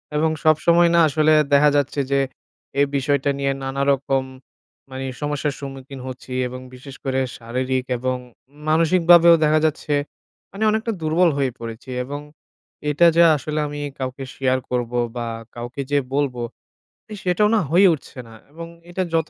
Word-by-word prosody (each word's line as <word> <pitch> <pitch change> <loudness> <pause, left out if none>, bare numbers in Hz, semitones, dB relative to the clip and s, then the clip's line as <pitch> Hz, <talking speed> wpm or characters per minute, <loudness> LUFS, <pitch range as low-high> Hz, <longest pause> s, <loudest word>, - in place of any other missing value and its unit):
এবং 160 +1 +2
সবসময় 170 +2 +4
না - - +5
আসলে 155 +1 +2 0.2
দেখা 150 +1 +6
যাচ্ছে 145 0 0
যে, 140 - +3 0.6
এ - - +5
বিষয়টা 140 +1 +1
নিয়ে 140 0 +1
নানা 135 +1 -3
রকম 135 -1 0 0.7
মানে 130 0 -6 0.2
সমস্যার 145 -1 -1
সম্মুখীন 135 -1 -8
হচ্ছি। 130 0 -8
এবং 130 +1 -7 0.2
বিশেষ 135 +1 -11
করে 135 -1 0 0.2
শারীরিক 130 +2 -2
এবং 130 +1 -1 0.5
মানসিকভাবেও 170 +1 +6
দেখা 155 +1 +4
যাচ্ছে, 150 -1 -1 0.6
মানে 200 +3 -4
অনেকটা 220 +1 -1
দুর্বল 165 +3 +3
হয়ে 135 -2 0
পড়েছি। 115 +2 -8
এবং 145 +3 -6 0.7
এটা 150 +4 +4
যে 170 - +7
আসলে 155 +1 -3
আমি 145 0 -6 0.2
কাউকে 130 +1 -4
share 130 -1 +1
করবো 125 -1 -2 0.2
বা 120 -1 -3 0.3
কাউকে 120 +3 -6
যেয়ে 145 -1 +2
বলবো, 135 -4 -1 0.8
সেটাও 185 +3 +2
না 220 - +4
হয়ে 190 +4 +6
উঠছে 140 -3 -9
না। 115 - -14 0.2
এবং 165 +2 -8 0.2
এটা 185 +2 -2
যত 160 -1 +1
140 Hz, 150 wpm, -21 LUFS, 130-160 Hz, 0.8 s, যে